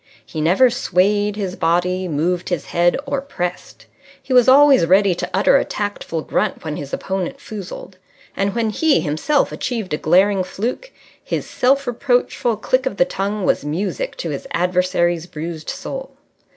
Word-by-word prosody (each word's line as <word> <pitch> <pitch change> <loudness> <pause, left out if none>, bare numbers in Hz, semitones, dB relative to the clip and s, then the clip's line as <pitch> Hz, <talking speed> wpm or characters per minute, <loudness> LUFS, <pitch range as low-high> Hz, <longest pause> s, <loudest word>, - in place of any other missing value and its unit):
He 155 - -5
never 195 +11 +4
swayed 205 -1 +1
his 195 -3 -3
body, 180 +2 0
moved 170 +3 -1
his 175 -5 -2
head, 175 0 +2
or 275 -1 -2
pressed. 180 -11 -5 0.3
He 260 - -4
was 250 0 +6
always 275 -7 +6
ready 195 +1 +4
to 170 - -4
utter - - +4
a - - +1
tactful 205 -6 -4
grunt - - -1
when 155 -2 -4
his 140 -2 -7
opponent 195 +8 -3
foozled. 195 -5 -8 0.4
And 195 0 -1
when 225 -2 0
he 305 - +2
himself 160 - 0
achieved 225 -9 -3
a - - +1
glaring 190 +5 +3
fluke, 240 - -4 0.3
his - - -3
self 275 +2 +1
reproachful 245 -2 0
click 255 +5 0
of 230 - -4
the 175 - +4
tongue 200 +1 -3
was - - +1
music 200 - -3
to - - -4
his - - -5
adversary's 180 -2 +1
bruised 160 -1 -6
soul. 270 -1 -6
195 Hz, 165 wpm, -20 LUFS, 175-250 Hz, 0.4 s, was